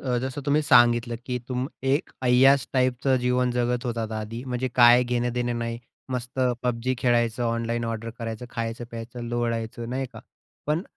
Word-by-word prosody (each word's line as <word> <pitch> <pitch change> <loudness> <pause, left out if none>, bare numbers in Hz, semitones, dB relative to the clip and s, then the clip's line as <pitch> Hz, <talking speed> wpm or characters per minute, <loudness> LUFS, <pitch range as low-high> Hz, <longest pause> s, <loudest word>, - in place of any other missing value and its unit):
अ, 125 -2 +1
जसं 135 +2 -4
तुम्ही 150 +2 +3
सांगितलं 120 -2 +4
की 125 -1 -2
तुम 125 0 -1 0.3
एक 145 - 0
अय्याश 130 +1 +5
टाईपचं 130 0 +2
जीवन 125 0 +1
जगत 125 0 0
होतात 115 -2 -3
आधी. 110 +2 -5
म्हणजे 130 0 -2
काय 120 0 +7
घेणं-देणं 120 0 -1
नाही, 115 0 -3 0.3
मस्त 125 +1 -5 0.2
पबजी 125 +1 0
खेळायचं, 120 -1 +1
ऑनलाईन 115 0 -1
ऑर्डर 115 0 -4
करायचं, 115 +1 -5
खायचं, 115 +1 -4
प्यायचं, 115 +1 -7
लोळायचं, 115 -1 -2
नाही 130 +1 -2
का? - - -10 0.5
पण 155 +3 +1
120 Hz, 160 wpm, -25 LUFS, 115-125 Hz, 0.5 s, काय